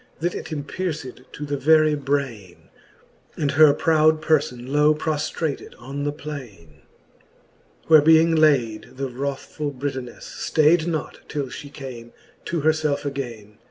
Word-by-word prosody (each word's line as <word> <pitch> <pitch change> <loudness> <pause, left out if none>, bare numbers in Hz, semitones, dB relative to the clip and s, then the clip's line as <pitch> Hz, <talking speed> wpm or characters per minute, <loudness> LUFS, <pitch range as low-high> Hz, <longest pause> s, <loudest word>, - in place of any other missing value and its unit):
That 175 +2 -1
it - - -7
empierced 150 -3 -5
to 150 - -6
the 145 0 -2
very 155 +2 +4
braine, 130 - -3 0.7
And 145 -2 0
her 155 0 +7
proud 155 +1 +3
perlbn 140 -6 0
low 150 +2 +4
proftrated 155 -1 -3
on 135 +4 -5
the 145 - 0
plaine. 120 - -10 1.0
XXXIV. - - -27
where 155 -2 +8
being 160 +2 +5
layd, 130 -9 +2
the 135 0 -2
wrathfuU 140 +2 -4
Britonefle 130 -2 -5
Stayd 160 +2 +2
not, 160 -4 -3
till 145 -2 -2
Ihe 145 +2 -9
came 125 -5 -9 0.3
to 170 -2 -2
herfelfe 155 -2 +1
againe. 115 -7 -6
145 Hz, 135 wpm, -23 LUFS, 130-155 Hz, 1.0 s, where